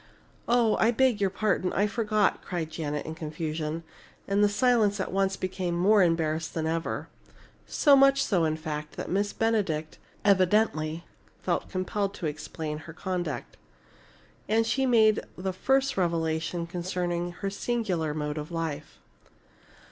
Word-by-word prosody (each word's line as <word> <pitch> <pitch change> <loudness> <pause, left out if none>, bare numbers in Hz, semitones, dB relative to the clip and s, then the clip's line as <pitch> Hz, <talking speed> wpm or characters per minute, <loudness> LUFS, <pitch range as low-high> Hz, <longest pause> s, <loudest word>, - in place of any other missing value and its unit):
"Oh! 235 -2 +3
I 220 - +4
beg 240 -2 +2
your 195 - +3
pardon 195 -2 0
I 200 - +2
forgot!" 215 -1 +1
cried 170 -4 -4
Janet, 150 -2 -3
in 160 - -5
confusion, 155 0 -4 0.4
and 200 +1 +2
the 205 - +5
silence 210 -2 +2
at 190 - -2
once 195 0 +1
became 185 -2 -2
more 200 +4 +4
embarrassed 165 -2 +1
than 160 -1 -1
ever. 165 +1 -2 0.6
So 285 -3 +5
much 275 0 +5
so, 180 -5 +1
in 155 -1 +1
fact, 150 -1 -5
that - - -5
Miss 205 +2 +1
Benedict 190 -9 -1 0.3
evidently 185 -5 +2 0.4
felt - - -2
impelled 195 +2 -1
to - - -5
explain 150 0 -4
her 165 +1 -10
conduct. 175 -6 -4 0.9
And 225 +1 +3
she 265 +3 +1
made 220 -3 +5 0.2
the 190 +1 -3
first 270 +7 +1
revelation 165 -1 0
concerning 175 0 -2
her 195 +2 -4
singular 195 -9 -1
mode 150 0 -2
of 150 - -6
life. 160 -3 -4
180 Hz, 145 wpm, -28 LUFS, 160-210 Hz, 0.9 s, the